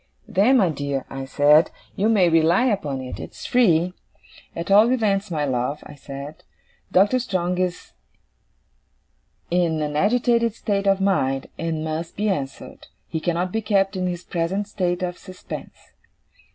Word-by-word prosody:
"Then, 220 +5 +4
my 190 -7 +3
dear," 140 -3 -3
I 135 0 -5
said, 145 +4 +4 0.3
"you 210 +3 +1
may 200 -6 +4
rely 165 +7 +3
upon 150 - -1
it, 130 -1 -7
it's - - -9
free. 180 -8 +3 0.6
At 170 +3 -4
all 215 +4 +6
events, 210 -5 +1
my 155 -4 -1
love," 130 +2 -2
said 140 +2 -8
I, - - -25 0.5
"Doctor 205 +7 +4
Strong 180 -6 -1
is 180 -1 -3 1.6
in 170 -3 +1
an 150 0 -3
agitated 230 +4 +2
state 200 -3 -1
of 195 0 +3
mind, 135 -9 0
and 165 -1 -2
must 160 +1 -4
be 210 +1 0
answered. 140 -8 -5 0.2
He 160 - -2
cannot 175 +2 -1
be 225 - -1
kept 200 -2 +1
in 185 -1 -1
his 175 0 -4
present 185 +4 -2
state 180 -3 -1
of 180 0 -4
suspense." 185 -2 -10
180 Hz, 150 wpm, -23 LUFS, 155-200 Hz, 1.6 s, all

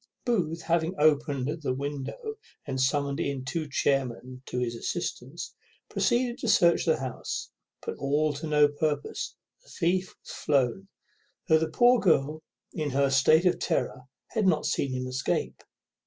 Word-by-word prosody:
Booth, 170 -9 0
having 170 +2 +1
opened 150 0 +2
the 130 -4 -1
window, 145 - -4 0.3
and 130 -2 -2
summoned 140 +1 +1
in 135 -2 -2
two 155 +1 -3
chairmen 130 -2 -1
to - - -4
his 125 -1 -1
assistance, 115 - -4 0.4
proceeded 240 0 +1
to - - -3
search 175 -5 +4
the 160 - +3
house; 130 -2 -5 0.3
but - - -4
all 145 +2 +1
to 150 +3 -5
no 150 -1 +5
purpose; 145 0 -2 0.3
the - - -22
thief 185 +1 0
was - - -10
flown, 140 +6 0 0.6
though 160 -3 +5
the 160 0 -1
poor 240 +9 +5
girl, 155 -5 +2 0.3
in 155 -2 -2
her 140 0 +2
state 155 +6 +5
of 180 - +3
terror, 130 - -1 0.3
had 215 -4 +1
not 160 -4 +2
seen 135 - 0
him 130 0 -2
escape. 130 +1 -2
150 Hz, 155 wpm, -28 LUFS, 135-170 Hz, 0.6 s, no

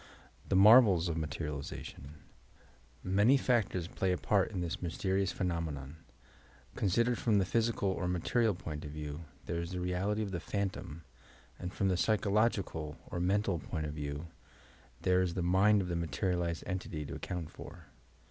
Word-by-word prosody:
THE - - +2
MARVELS 100 -4 +7
OF 80 - -2
MATERIALIZATION 75 -2 -5 0.9
Many 105 +8 +4
factors 115 -9 +1
play 95 +1 -1
a 90 - +1
part 100 0 +2
in 100 - -4
this 85 +3 -3
mysterious 95 +2 0
phe 95 - -4
nomenon. 80 -5 -3 0.8
Considered 115 +5 +1
from 110 -3 +2
the 95 - +3
physical 115 -1 +1
or 95 -1 -1
material 100 +5 +1
point 75 -3 -6
of 75 - -6
view, 75 +2 -6 0.2
there 85 0 -2
is 85 +2 -5
the 90 - -2
reality 95 +4 0
of 100 - -4
the 90 - -2
phantom, 95 -4 -4 0.6
and 90 - -4
from 95 - 0
the 95 -2 +2
psychological 100 -7 +1
or 85 - -2
mental 95 0 +1
point 80 +1 -4
of 75 - -4
view, 75 +1 -4 0.8
there 90 0 +4
is 90 -2 -1
the 90 - -1
mind 95 +3 +4
of - - -5
the 85 - -2
materialized 85 +1 -1
entity 90 -5 -4
to - - -6
account 85 -3 -5
for. 85 +2 -11
90 Hz, 165 wpm, -32 LUFS, 80-100 Hz, 0.9 s, MARVELS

